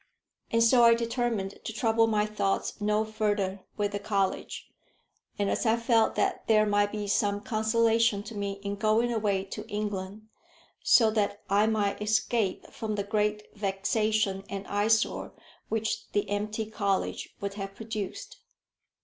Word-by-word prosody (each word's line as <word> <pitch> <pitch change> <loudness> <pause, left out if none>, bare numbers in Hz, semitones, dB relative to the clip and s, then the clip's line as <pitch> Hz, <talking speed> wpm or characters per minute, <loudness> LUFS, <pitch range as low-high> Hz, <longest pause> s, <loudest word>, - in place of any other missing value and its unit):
And 230 0 +3
so 240 +1 +5
I 230 0 +7
determined 230 -4 -2
to - - -4
trouble 225 0 +2
my 210 -1 +2
thoughts 210 0 -2
no 210 +1 +1
further 205 -3 -1 0.2
with 205 -1 0
the 205 - -3
college. 200 -2 -2 0.7
And 200 -1 0
I 225 -1 +2
felt 230 -1 +2
that - - -1
there 215 -1 +5
might 205 0 +2
be 210 -1 -4
some 205 0 +1
consolation 225 -1 +2
to 230 - -9
me 200 -1 -3
in 200 0 -3
going 220 +3 +2
away 205 -4 0
to 210 +2 -8
England, 205 -1 -4 0.6
so 225 -3 +5
that 205 -1 -1
I 205 +2 +4
might 210 -2 0
escape 215 -1 0
from 215 -1 -4
the 200 - -1
great 210 +1 -1
vexation 205 0 0
and 195 0 -5
eyesore 210 +2 +1 0.4
which 220 0 -2
the 205 0 +1
empty 210 +2 -2
college 200 -3 -2
would 200 0 -3
have 195 -1 -6
produced. 215 -3 -6
210 Hz, 150 wpm, -28 LUFS, 200-220 Hz, 0.7 s, I